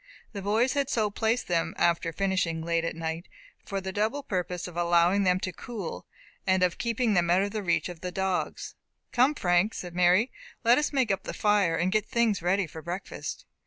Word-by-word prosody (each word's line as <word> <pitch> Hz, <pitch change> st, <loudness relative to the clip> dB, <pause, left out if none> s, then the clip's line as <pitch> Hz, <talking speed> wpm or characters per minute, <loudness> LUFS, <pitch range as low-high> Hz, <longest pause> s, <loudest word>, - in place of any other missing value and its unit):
The 200 Hz, -, -5 dB
boys 220 Hz, +6 st, +2 dB
had 280 Hz, -2 st, 0 dB
so 215 Hz, -5 st, +1 dB
placed 225 Hz, +4 st, 0 dB
them, 170 Hz, -2 st, 0 dB
after 170 Hz, -1 st, +2 dB
finishing, 175 Hz, -3 st, -1 dB
late 170 Hz, 0 st, 0 dB
at 165 Hz, -, -2 dB
night, 165 Hz, +1 st, -4 dB, 0.4 s
for 195 Hz, -, -3 dB
the 190 Hz, 0 st, -5 dB
double 220 Hz, +8 st, -1 dB
purpose 180 Hz, -5 st, -3 dB
of 175 Hz, -, -10 dB
allowing 175 Hz, +3 st, +3 dB
them 180 Hz, 0 st, +3 dB
to 185 Hz, -, -3 dB
cool 215 Hz, -3 st, -7 dB, 0.4 s
and 185 Hz, -1 st, +3 dB
of 180 Hz, -1 st, +1 dB
keeping 235 Hz, -1 st, +1 dB
them 175 Hz, -2 st, +2 dB
out 180 Hz, +3 st, +4 dB
of 205 Hz, -1 st, -4 dB
reach 170 Hz, -, +2 dB
of 175 Hz, -2 st, -9 dB
the 180 Hz, -, -4 dB
dogs. 190 Hz, 0 st, -2 dB, 0.4 s
"Come, 260 Hz, +5 st, +3 dB
Frank," 180 Hz, 0 st, +2 dB
said 175 Hz, -2 st, -6 dB
Mary, 180 Hz, +7 st, +3 dB, 0.3 s
"let 240 Hz, +3 st, +5 dB
us 295 Hz, -, -1 dB
make 260 Hz, -7 st, +1 dB
up 195 Hz, -, 0 dB
the -, -, -6 dB
fire, 205 Hz, -5 st, +2 dB
and 175 Hz, +3 st, 0 dB
get 215 Hz, 0 st, +1 dB
things 230 Hz, -5 st, +1 dB
ready 190 Hz, +3 st, +1 dB
for 160 Hz, 0 st, -9 dB
breakfast." 175 Hz, +4 st, -6 dB
190 Hz, 200 wpm, -28 LUFS, 175-215 Hz, 0.4 s, let